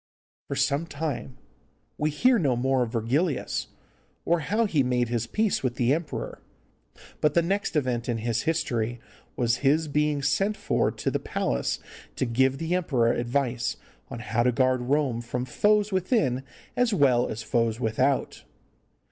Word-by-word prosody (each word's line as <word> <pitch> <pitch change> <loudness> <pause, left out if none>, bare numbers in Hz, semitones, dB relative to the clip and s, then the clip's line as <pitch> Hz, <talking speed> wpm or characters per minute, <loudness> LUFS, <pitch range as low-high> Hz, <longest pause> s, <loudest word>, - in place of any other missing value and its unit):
For - - -3
some 145 +4 +1
time 145 -4 -4 0.6
we 150 - 0
hear 240 - +3
no 140 -8 +2
more 130 +2 +1
of 120 -2 -1
Virgilius, 130 +7 0 0.6
or 170 +1 +2
how 210 +9 +1
he 160 -9 +2
made 125 -2 +1
his 115 -1 -1
peace 215 - 0
with 125 -2 -1
the 125 +3 +2
emperor, 160 -1 -4 0.8
but 150 - +2
the 170 - +4
next 195 +1 -1
event 125 -5 0
in 120 - 0
his 115 0 -1
history 120 -8 -1 0.4
was 120 -1 +1
his 150 +4 +2
being 150 -1 0
sent 195 +10 +1
for - - +1
to - - -3
the - - 0
palace 60 - -1 0.4
to - - 0
give 130 +3 +2
the 165 +4 -2
emperor 130 -10 +2
advice 120 -1 -1 0.3
how 120 -1 -2
to 125 +1 +3
guard 130 +1 +2
Rome 130 -2 0
from 125 +1 -3
foes 210 +8 +2
within 185 - +1 0.3
as 245 -4 +2
well 130 -7 +4
as 110 +1 -5
foes 115 0 0
without. 130 +4 0
130 Hz, 155 wpm, -26 LUFS, 120-160 Hz, 0.8 s, the